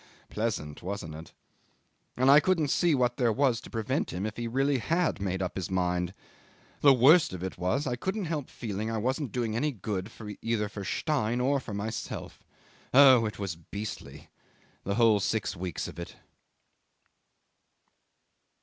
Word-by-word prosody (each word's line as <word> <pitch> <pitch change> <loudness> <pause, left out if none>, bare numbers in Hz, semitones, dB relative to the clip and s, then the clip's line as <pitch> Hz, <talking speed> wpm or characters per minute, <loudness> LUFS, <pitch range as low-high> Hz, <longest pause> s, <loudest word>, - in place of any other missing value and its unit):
Pleasant, 100 -10 -3
wasn't 90 -4 -5
it? 80 +1 -10 0.9
And 130 +2 +5
I 145 - +9
couldn't 165 -3 +1
see 170 +2 +3
what 125 -2 +1
there 120 -3 +2
was 125 -1 +1
to - - -12
prevent 115 +5 -2
him 90 +4 -3
if 110 0 -4
he 120 0 -3
really 135 +3 +1
had 165 - 0
made 95 -1 -1
up 90 - -4
his 95 -3 -3
mind. 90 0 -1 0.6
The 140 - +7
worst 135 - +6
of 90 -1 -6
it 95 - -4
was, 95 - 0
I 125 -3 -1
couldn't 190 - -3
help 155 -4 -3
feeling 110 -1 -4
I 115 - -2
wasn't 130 +3 -1
doing 115 -3 -2
any 150 +6 +1
good 100 -3 -4 0.3
either 115 -2 -1
for 100 -1 -7
Stein 120 - -1
or 135 +3 +2
for 115 -5 -7
myself. 110 +2 -5 0.5
Oh! 130 -4 +7
it 105 - -7
was 95 -4 -3
beastly 100 +5 -8 0.6
the 100 - -1
whole 115 -3 +5
six 100 0 -1
weeks 90 -1 -4
of - - -9
it." 85 - -7
115 Hz, 165 wpm, -29 LUFS, 95-135 Hz, 0.9 s, I